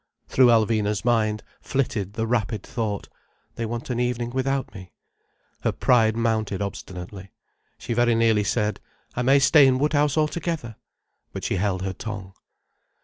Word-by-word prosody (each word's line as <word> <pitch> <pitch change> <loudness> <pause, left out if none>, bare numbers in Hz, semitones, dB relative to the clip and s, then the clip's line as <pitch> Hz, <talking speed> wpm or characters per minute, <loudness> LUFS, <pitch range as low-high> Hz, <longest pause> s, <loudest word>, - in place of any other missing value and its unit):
Through 130 -1 +5
Alvina's 110 -2 +2
mind 110 -3 +1 0.2
flitted 120 -8 -2
the 110 0 -2
rapid 110 -3 -1
thought—"They 110 +1 -6
want 120 +2 -5
an 120 - -1
evening 120 -1 -1
without 135 -1 -1
me." 95 -3 -11 0.7
Her - - 0
pride 115 -3 +3
mounted 110 -4 0
obstinately. 95 -1 -7 0.5
She - - -4
very 120 0 +3
nearly 115 -2 +3
said—"I 105 +3 -3
may 135 +3 +5
stay 140 +1 +6
in 130 -1 +3
Woodhouse 145 +1 +1
altogether." 155 -6 -1 0.6
But - - -6
she - - -1
held 95 -1 -1
her 95 -1 -2
tongue. 100 -1 -7
115 Hz, 140 wpm, -24 LUFS, 105-125 Hz, 0.7 s, stay